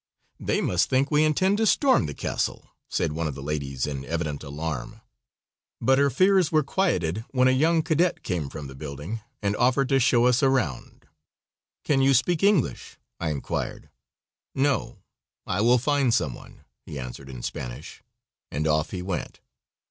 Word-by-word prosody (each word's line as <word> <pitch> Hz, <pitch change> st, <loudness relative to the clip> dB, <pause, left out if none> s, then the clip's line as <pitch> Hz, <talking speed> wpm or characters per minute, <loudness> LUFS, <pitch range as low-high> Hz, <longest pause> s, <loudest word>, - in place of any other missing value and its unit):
"They -, -, 0 dB
must 90 Hz, 0 st, +1 dB
think 135 Hz, +2 st, +1 dB
we 150 Hz, 0 st, +4 dB
intend 185 Hz, +6 st, +2 dB
to 225 Hz, -, +3 dB
storm 265 Hz, -, +3 dB
the 75 Hz, -, -6 dB
castle," -, -, -3 dB, 0.2 s
said -, -, 0 dB
one 80 Hz, +1 st, -2 dB
of 70 Hz, -, -4 dB
the 70 Hz, -, -8 dB
ladies 70 Hz, -3 st, -2 dB
in 70 Hz, -2 st, -4 dB
evident 80 Hz, -3 st, -3 dB
alarm, 75 Hz, -2 st, -5 dB, 0.8 s
but 135 Hz, +1 st, +3 dB
her 140 Hz, 0 st, +4 dB
fears 185 Hz, +3 st, +3 dB
were 155 Hz, -1 st, +3 dB
quieted 110 Hz, -, 0 dB
when 130 Hz, -1 st, +3 dB
a -, -, +5 dB
young 160 Hz, +5 st, +3 dB
cadet 165 Hz, +2 st, +1 dB
came 85 Hz, -7 st, -2 dB
from 75 Hz, -, -7 dB
the 65 Hz, -, -9 dB
building 75 Hz, +10 st, -6 dB, 0.2 s
and 100 Hz, 0 st, +1 dB
offered 130 Hz, +2 st, +2 dB
to 135 Hz, -, +4 dB
show 120 Hz, -1 st, +4 dB
us 125 Hz, +2 st, +3 dB
around. 130 Hz, -, -1 dB, 0.8 s
"Can 135 Hz, -3 st, +2 dB
you 135 Hz, 0 st, +4 dB
speak 160 Hz, +6 st, +2 dB
English?" 200 Hz, -8 st, +1 dB, 0.2 s
I 85 Hz, -, -1 dB
inquired. 75 Hz, 0 st, -4 dB, 0.6 s
"No, 140 Hz, +1 st, 0 dB, 0.4 s
I 90 Hz, -, -1 dB
will 120 Hz, +3 st, +5 dB
find 140 Hz, 0 st, +1 dB
some 75 Hz, -, +1 dB
one," -, -, -14 dB, 0.2 s
he 75 Hz, -, -8 dB
answered 65 Hz, +1 st, -7 dB
in 65 Hz, -2 st, -8 dB
Spanish, -, -, -6 dB, 0.5 s
and 75 Hz, +2 st, -2 dB
off 75 Hz, -1 st, +1 dB
he 90 Hz, -1 st, -5 dB
went. 90 Hz, -3 st, -4 dB
115 Hz, 170 wpm, -25 LUFS, -, 0.8 s, a